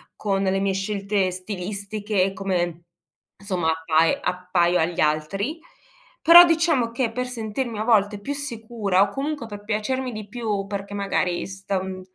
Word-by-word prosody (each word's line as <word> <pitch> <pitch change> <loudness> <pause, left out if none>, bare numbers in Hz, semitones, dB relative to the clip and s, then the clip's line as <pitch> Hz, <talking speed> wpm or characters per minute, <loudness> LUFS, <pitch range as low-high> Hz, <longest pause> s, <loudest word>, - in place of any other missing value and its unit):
con 195 -2 -1
le 195 0 +1
mie 195 0 +1
scelte 195 0 -1
stilistiche, 200 +1 -2
come 175 -3 -2 0.5
insomma 185 -5 -1
appai 160 0 +2
appaio 180 -1 +1
agli 170 +2 0
altri, 195 - -1 0.6
però 340 +2 +10
diciamo, 325 -8 +2
che 235 -1 -1
per 250 +2 -3
sentirmi 230 0 -4
a 215 - -1
volte 210 -3 +2
più 280 +7 -3
sicura, 225 -8 -1
o 200 - +4
comunque 280 +2 -4
per 205 -1 -9
piacermi 250 +5 -2
di 215 -1 -7
più, 210 -4 -2
perché 200 0 -5
magari 195 -3 -1
stan 190 -1 -4
200 Hz, 145 wpm, -23 LUFS, 185-230 Hz, 0.6 s, però